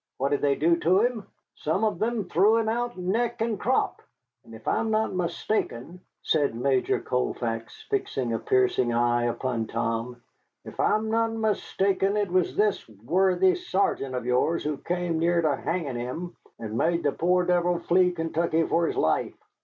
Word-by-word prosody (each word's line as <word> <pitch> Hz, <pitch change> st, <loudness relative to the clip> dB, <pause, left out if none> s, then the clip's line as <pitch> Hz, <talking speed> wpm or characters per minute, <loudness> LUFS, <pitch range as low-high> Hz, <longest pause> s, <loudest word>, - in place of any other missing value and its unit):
What 135 Hz, +1 st, 0 dB
did 145 Hz, -, 0 dB
they 140 Hz, -1 st, +2 dB
do 170 Hz, +4 st, +3 dB
to 180 Hz, +4 st, +3 dB
him? 235 Hz, -3 st, -1 dB, 0.3 s
Some 160 Hz, +7 st, -1 dB
of 215 Hz, -, 0 dB
them 220 Hz, -3 st, -1 dB
threw 200 Hz, +7 st, +4 dB
him 225 Hz, -1 st, 0 dB
out 240 Hz, +1 st, -2 dB
neck 225 Hz, +6 st, -1 dB
and 225 Hz, -2 st, -1 dB
crop. 260 Hz, +2 st, 0 dB, 0.4 s
And -, -, -13 dB
if -, -, -14 dB
I -, -, +2 dB
am 225 Hz, -, -1 dB
not 220 Hz, -1 st, 0 dB
mistaken," 175 Hz, -, -3 dB, 0.2 s
said 145 Hz, -7 st, +1 dB
Major 130 Hz, +2 st, +1 dB
Colfax, 115 Hz, -2 st, -3 dB
fixing 135 Hz, -, -2 dB
a 115 Hz, -, -1 dB
piercing 125 Hz, -1 st, +2 dB
eye 120 Hz, 0 st, +2 dB
upon 120 Hz, -1 st, -2 dB
Tom, 115 Hz, +2 st, -3 dB, 0.5 s
"if -, -, -11 dB
I -, -, +3 dB
am 220 Hz, +1 st, -2 dB
not 225 Hz, 0 st, +1 dB
mistaken, 200 Hz, -2 st, 0 dB
it 205 Hz, -4 st, -1 dB
was 185 Hz, -1 st, +1 dB
this 210 Hz, -, 0 dB
worthy 180 Hz, -, +2 dB
sergeant 195 Hz, -, -1 dB
of 125 Hz, -, -3 dB
yours 125 Hz, +7 st, +1 dB
who 150 Hz, -1 st, -2 dB
came 175 Hz, -1 st, -2 dB
near 170 Hz, +1 st, +2 dB
to 150 Hz, -3 st, +2 dB
hanging 150 Hz, -5 st, -3 dB
him, 165 Hz, +9 st, -5 dB, 0.2 s
and 110 Hz, -1 st, -6 dB
made 170 Hz, +7 st, +1 dB
the 145 Hz, -, +2 dB
poor 180 Hz, +3 st, +1 dB
devil 175 Hz, 0 st, +2 dB
flee 180 Hz, +1 st, +3 dB
Kentucky 165 Hz, -1 st, 0 dB
for 170 Hz, 0 st, +1 dB
his -, -, -3 dB
life." -, -, +1 dB
170 Hz, 175 wpm, -26 LUFS, 130-205 Hz, 0.5 s, threw